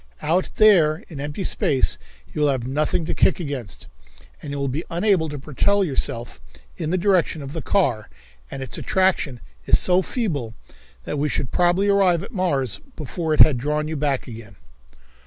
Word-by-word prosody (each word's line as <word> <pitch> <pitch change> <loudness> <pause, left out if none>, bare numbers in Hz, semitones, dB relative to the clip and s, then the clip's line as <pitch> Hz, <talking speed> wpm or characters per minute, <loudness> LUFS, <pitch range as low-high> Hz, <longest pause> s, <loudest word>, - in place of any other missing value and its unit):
Out 175 +4 0
there 170 -8 +4
in 155 -5 -8
empty 145 +6 -4
space 130 - +1 0.3
you 150 - -3
will 150 - +4
have 130 -4 -1
nothing 150 +4 0
to - - -2
kick - - +2
against, 140 - -6 0.6
and 145 - -8
you 145 - -4
will 140 0 -1
be 140 +6 -3
unable 175 -2 +1
to 145 - -6
propel 175 +9 +1
yourself 125 -7 -3 0.3
in 155 - -4
the 185 - +1
direction 180 -5 +1
of 135 +1 -8
the 165 - -4
car, 130 - 0 0.4
and 135 - -6
its 130 - -4
attraction 185 -10 0 0.3
is - - +6
so 180 +1 +3
feeble 150 - -3 0.5
that 145 - -4
we 150 +1 0
should 130 - -2
probably 180 +3 +2
arrive 190 -4 +3
at 200 - -9
Mars 145 - -1
before 155 +1 -2
it - - +5
had 135 -6 +6
drawn 150 +3 -1
you 160 - -4
back 140 -3 -1
again." 110 -4 -10
150 Hz, 180 wpm, -22 LUFS, 135-180 Hz, 0.6 s, is